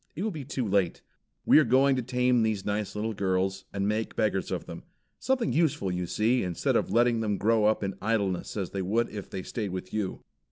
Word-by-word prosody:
It 175 - -3
will 220 - -1
be 155 -6 -6
too 130 -4 -2
late. 95 -3 0 0.4
We - - +7
are - - +5
going 135 +2 +4
to 130 - 0
tame 125 0 +2
these 110 -3 0
nice 105 0 -2
little 110 +2 -2
girls, 95 -1 -1
and 100 0 -1
make 110 +1 -1
beggars 105 -3 0
of - - -3
them. - - -8 0.4
Something 255 -4 0
useful, 150 - +1
you 90 0 -2
see, 115 +7 +1
instead 90 -2 -1
of - - +1
letting 120 0 +3
them 105 -3 0
grow 110 +1 +2
up 110 0 +2
in 100 0 -2
idleness 100 -3 -1
as 95 -4 -3
they 100 - -3
would 110 +6 0
if 100 -2 -7
they 95 - -5
stayed 105 0 -4
with 95 0 -6
you. 105 -3 -3
110 Hz, 225 wpm, -28 LUFS, 95-120 Hz, 0.4 s, We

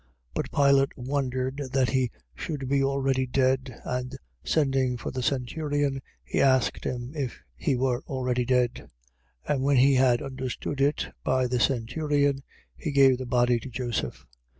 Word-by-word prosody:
15:44. - - -37 0.3
But - - -3
Pilate 140 -1 +3
wondered 130 0 -2 0.2
that 130 -2 +3
he 130 -2 +1 0.2
should 140 - -5
be 140 +1 +2
already 135 -1 +1
dead. 130 -1 0
And 125 +1 -3 0.3
sending 135 -4 +1
for 120 - -5
the 130 - -3
centurion, 140 +2 -1 0.2
he - - -1
asked 130 -2 +2
him 125 +2 -4
if 135 -5 -3 0.2
he 140 -6 0
were 125 -1 0
already 125 -2 -1
dead. 125 -1 0 0.6
15:45. - - +2
And 135 -2 -1
when 140 0 +3
he 135 +2 +6
had 130 0 +3
understood 130 +1 -4
it 145 +2 +1
by 130 -1 +2
the 125 0 0
centurion, 140 +3 +1 0.3
he 155 - -4
gave 135 -3 +5
the 130 - -5
body 120 -1 +3
to 130 - -8
Joseph. 120 - -3
130 Hz, 160 wpm, -27 LUFS, 125-140 Hz, 0.6 s, he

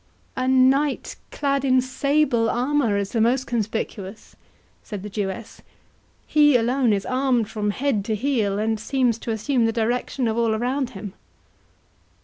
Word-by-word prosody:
"A 255 -1 -1
knight, 265 +2 +2
clad 275 -1 -1
in 260 -1 +4
sable 260 -2 +1
armour, 250 -3 +1
is 200 -1 -2
the 225 - 0
most 250 +3 +2
conspicuous," 220 -3 -4 0.5
said 205 -3 -7
the 210 - -7
Jewess; 205 +2 -5 0.6
"he 295 -2 +4
alone 245 +1 +1
is 200 -1 0
armed 255 -4 0
from 210 -1 -2
head 245 -1 0
to 220 - -1
heel, 215 -5 0
and 220 +1 -1
seems 245 -1 0
to - - -7
assume 230 +2 +1
the - - +1
direction 240 +2 -1
of 225 +1 -1
all 225 -2 +2
around 250 +3 -1
him." 195 -1 -7
235 Hz, 150 wpm, -23 LUFS, 220-265 Hz, 0.6 s, in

